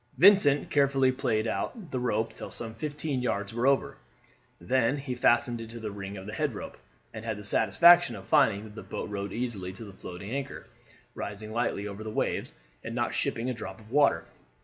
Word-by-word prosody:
Vincent 160 -4 +6
carefully 135 -2 +4
played 115 -4 0
out 155 - -3
the 130 - -1
rope 115 -2 0
till - - -8
some 115 -1 -4
fifteen 145 +1 -3
yards 105 -4 -2
were 120 +3 +1
over, 140 -1 +2 0.6
then 130 +2 +1
he 135 -2 -4
fastened 120 -1 +2
it 115 - -8
to 115 +1 -8
the 110 -2 -4
ring 100 0 -6
of 95 - -8
the 105 - -7
head - - -1
rope, - - -7 0.4
and 110 - -7
had 110 -2 -3
the 105 - -8
satisfaction 170 +5 +6
of 95 -1 -9
finding 100 0 +3
that 110 -1 -11
the 110 - -8
boat - - -6
rode 100 -1 -3
easily 110 -6 -3
to 105 +4 -9
the 100 - -11
floating 95 +2 -8
anchor, 140 +1 -4 0.5
rising 105 +1 -6
lightly 110 -3 -1
over 100 +1 -7
the 110 - -5
waves, - - -1 0.3
and - - -5
not - - 0
shipping 115 +2 -1
a 130 - 0
drop 110 -3 -7
of 110 +1 -16
water. 140 - +3
115 Hz, 205 wpm, -29 LUFS, 105-130 Hz, 0.6 s, Vincent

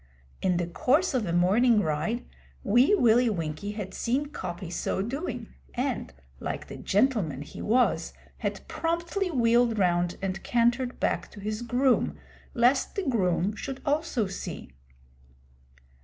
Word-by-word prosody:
In 180 -2 +2
the 175 - 0
course 275 - +2
of 240 -6 0
a - - -1
morning 210 +7 +4
ride, 165 +9 -1 0.4
Wee 245 - +5
Willie 240 - +4
Winkie 170 +1 -3
had 200 -3 -6
seen 270 +5 -1
Coppy 180 - -6
so 190 +2 -1
doing, 265 - -4 0.2
and, - - -2 0.3
like - - -4
the - - -8
gentleman 200 - +1
he - - -10
was, 245 +4 +2 0.3
had - - -4
promptly 340 +3 -1
wheeled 235 -4 +3
round 175 -2 +1
and 195 0 -3
cantered 240 +1 +1
back - - 0
to 210 - -12
his 215 +2 -3
groom, 245 +2 +2 0.4
lest 245 +3 +3
the 395 - -1
groom 195 -4 +1
should 270 +3 -5
also 290 -6 +1
see. 190 - -6
230 Hz, 140 wpm, -27 LUFS, 185-255 Hz, 0.4 s, Wee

